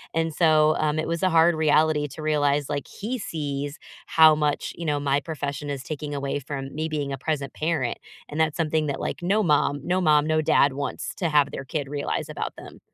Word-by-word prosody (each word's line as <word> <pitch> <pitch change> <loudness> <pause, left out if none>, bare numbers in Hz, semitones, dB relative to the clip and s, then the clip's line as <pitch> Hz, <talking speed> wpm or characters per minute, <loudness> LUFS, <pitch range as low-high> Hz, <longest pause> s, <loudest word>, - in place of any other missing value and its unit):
And 165 -1 0
so, 155 -1 +4
um, 155 0 +1
it 155 - -1
was 170 +1 -2
a 185 - +3
hard 165 0 +5
reality 155 -1 +3
to 150 +3 -10
realize, 145 -2 +1
like, 145 -1 -3
he 240 +5 -5
sees 145 -5 -4 0.3
how 160 -1 +7
much, 150 -1 -1
you 170 - -6
know, 145 -2 0
my 140 0 +1
profession 145 -2 -5
is 140 -2 -4
taking 150 -1 -5
away 140 0 -2
from 135 -1 -6
me 155 +2 -3
being 145 -3 -2
a - - -3
present 145 0 -3
parent. 155 -7 -1 0.3
And 150 - -5
that's 160 -1 +1
something 155 -2 0
that, 140 -1 -3
like, - - -4
no 205 +5 +2
mom 145 -3 +2
no 180 +1 +1
mom, 150 -3 +4
no 155 0 +2
dad 140 -2 +4
wants 140 +1 -4
to 175 - -1
have 145 -2 +3
their 135 - -6
kid 145 -1 -3
realize 145 0 -3
about - - -4
them. - - -12
150 Hz, 220 wpm, -25 LUFS, 145-160 Hz, 0.3 s, how